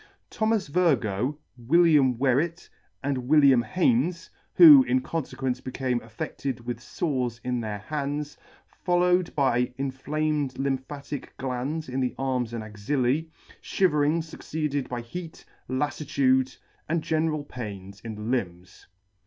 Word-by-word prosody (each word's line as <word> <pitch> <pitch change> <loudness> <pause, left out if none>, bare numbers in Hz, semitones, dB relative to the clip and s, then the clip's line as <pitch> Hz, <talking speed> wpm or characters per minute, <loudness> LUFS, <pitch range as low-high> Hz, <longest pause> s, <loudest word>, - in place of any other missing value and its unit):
Thomas 220 -2 +1
Virgoe, 140 - +1 0.2
William 145 -1 +4
Wherret, 140 +7 0 0.4
and 130 -3 -2
William 140 -5 +6
Haynes, 180 - 0 0.2
who 305 -5 +10
in 260 - +2
confequence 135 - -3
became 130 -1 -1
affedted 120 +4 -5
[•33 120 - -17
] - - -18
affe&ed - - -21
with 120 0 -4
fores 125 -7 -2
in 125 -1 -1
their 105 -2 -4
hands, 145 +5 -4 0.5
followed 180 0 +2
by 125 -3 +2
inflamed 145 +1 -2
lym 135 -1 0
phatic 140 +1 -7
glands 135 +5 -3
in 130 +1 -3
the 125 -1 -1
arms 130 -3 -1
and 115 -2 -4
axillae, 125 +8 -1 0.3
fliiverings 160 -2 +1
fucceeded 150 -3 -3
by 120 -1 -3
heat, 160 +8 -8 0.2
laflitude 130 -1 +1 0.3
and 165 -1 0
general 155 -1 0
pains 100 -7 -8
in 115 -2 -6
the 105 - -9
limbs. 95 -6 -4
135 Hz, 130 wpm, -26 LUFS, 125-155 Hz, 0.5 s, who